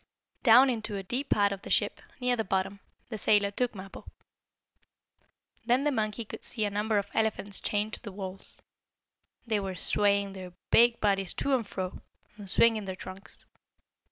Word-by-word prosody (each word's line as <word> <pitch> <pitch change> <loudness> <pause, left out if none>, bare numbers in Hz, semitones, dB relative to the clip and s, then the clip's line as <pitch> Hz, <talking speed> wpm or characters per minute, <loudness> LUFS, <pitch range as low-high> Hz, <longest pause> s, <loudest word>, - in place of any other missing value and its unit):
Down 250 +2 +7
into 215 -3 -4
a 195 - -5
deep 250 +8 -3
part 205 -1 +3
of 195 -1 -5
the - - -9
ship, - - 0 0.2
near 250 -1 +1
the 225 - -1
bottom, 195 0 -2 0.3
the 220 -3 -4
sailor 205 -1 +3
took 245 +2 -1
Mappo. 195 0 -10 1.6
Then 245 +4 +2
the 295 - +2
monkey 220 -2 -2
could - - -9
see 220 -3 -2
a 205 - -2
number 210 +1 0
of 200 - 0
elephants 215 -3 +4
chained 210 +1 -1
to - - -3
the 210 - -8
walls. 190 0 -6 0.9
They 220 -3 0
were 190 -2 -4
swaying 200 +2 +2
their 185 -2 -9 0.2
big 235 0 +5
bodies 195 -3 +1
to 280 - 0
and 240 -5 +1
fro, 185 -2 -5 0.3
and 205 -2 -10
swinging 225 -1 +4
their 190 -1 -5
trunks. 185 +2 -8
205 Hz, 175 wpm, -29 LUFS, 195-225 Hz, 1.6 s, Down